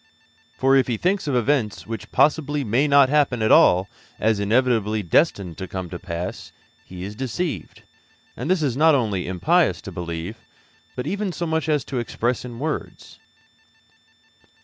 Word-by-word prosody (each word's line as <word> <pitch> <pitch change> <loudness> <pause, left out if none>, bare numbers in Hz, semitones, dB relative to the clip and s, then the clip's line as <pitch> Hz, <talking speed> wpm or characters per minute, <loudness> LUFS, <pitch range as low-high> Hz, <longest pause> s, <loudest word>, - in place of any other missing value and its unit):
For 135 +1 +3
if 135 - +3
He 120 -3 -1
thinks 185 - 0
of 140 - 0
events 125 -3 0
which 115 0 -7
possibly 150 -1 +2
may 125 +6 +1
not 140 -1 +6
happen 140 -6 +2
at 110 - +2
all 90 +2 +5 0.3
as 110 -1 +1
inevitably 110 -1 +1
destined 90 - +1
to 95 - -5
come 95 -1 -6
to 85 - -6
pass, 90 -1 -6 0.3
He 90 -1 -9
is 100 +2 -6
deceived; 130 - -4 0.5
and - - -5
this 185 -4 +2
it - - +2
is 125 -4 -1
not 160 0 +5
only 105 -9 -1
impious 90 -1 +2
to - - -7
believe, 85 +4 -5 0.6
but 125 - -4
even 200 -1 -2
so 175 0 -4
much 160 -1 -1
as 150 -4 +1
to 130 - -3
express 120 +1 -2
in 120 -2 -8
words. 155 +4 -5
120 Hz, 170 wpm, -22 LUFS, 100-145 Hz, 0.6 s, not